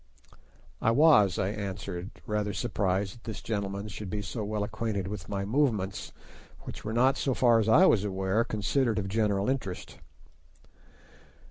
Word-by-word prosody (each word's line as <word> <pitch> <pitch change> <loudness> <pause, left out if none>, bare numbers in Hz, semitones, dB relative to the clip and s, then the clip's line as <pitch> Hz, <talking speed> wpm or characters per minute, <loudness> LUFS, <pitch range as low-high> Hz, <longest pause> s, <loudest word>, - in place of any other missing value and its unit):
"I - - +3
was," 115 - +5
I 95 - 0
answered, 95 -3 -5 0.2
rather 105 -1 -1
surprised 100 -4 -1
that 120 - -18
this 110 -3 -5
gentleman 100 -1 -3
should 105 -1 -7
be 105 +2 -3
so 110 +1 -4
well 105 0 -2
acquainted 105 -2 -3
with 100 -3 -6
my 100 -1 -2
movements, 105 -5 0 0.5
which - - -9
were 110 - -4
not, 130 +4 +3
so 135 -3 0
far 120 -2 +4
as 110 0 +1
I 165 +12 +7
was 105 - +4
aware, 95 +2 0
considered 115 +2 0
of 100 -2 -1
general 100 -1 +1
interest. 125 -9 -3
105 Hz, 155 wpm, -29 LUFS, 100-115 Hz, 0.5 s, I